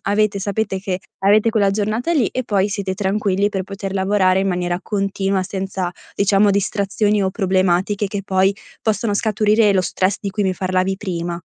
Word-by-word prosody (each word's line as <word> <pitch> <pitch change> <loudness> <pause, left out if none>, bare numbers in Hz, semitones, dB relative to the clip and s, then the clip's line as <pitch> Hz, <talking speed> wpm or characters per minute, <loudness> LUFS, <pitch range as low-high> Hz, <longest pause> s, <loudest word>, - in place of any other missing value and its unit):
avete 205 0 +1
sapete 200 0 -2
che 190 -1 -3 0.2
avete 210 +3 +4
quella 205 -3 +2
giornata 215 +9 -1
lì, 265 -10 +2
e 255 - -3
poi 200 -2 +1
siete 195 -2 -3
tranquilli 200 0 0
per 190 -2 -3
poter 195 0 -6
lavorare 190 -1 +2
in 195 - 0
maniera 175 -1 -1
continua, 195 -2 -1
senza, 190 -1 -3 0.2
diciamo, 200 +1 +3
distrazioni 200 +1 +1
o 190 - +1
problematiche 190 0 +1
che 200 0 -4
poi 190 +1 +2 0.3
possono 220 -1 0
scaturire 215 0 +3
lo 190 - +3
stress 185 +2 0
di 200 - -3
cui 205 +1 -1
mi 190 - +1
parlavi 185 +1 0
prima. 175 -3 -4
195 Hz, 170 wpm, -19 LUFS, 190-210 Hz, 0.3 s, avete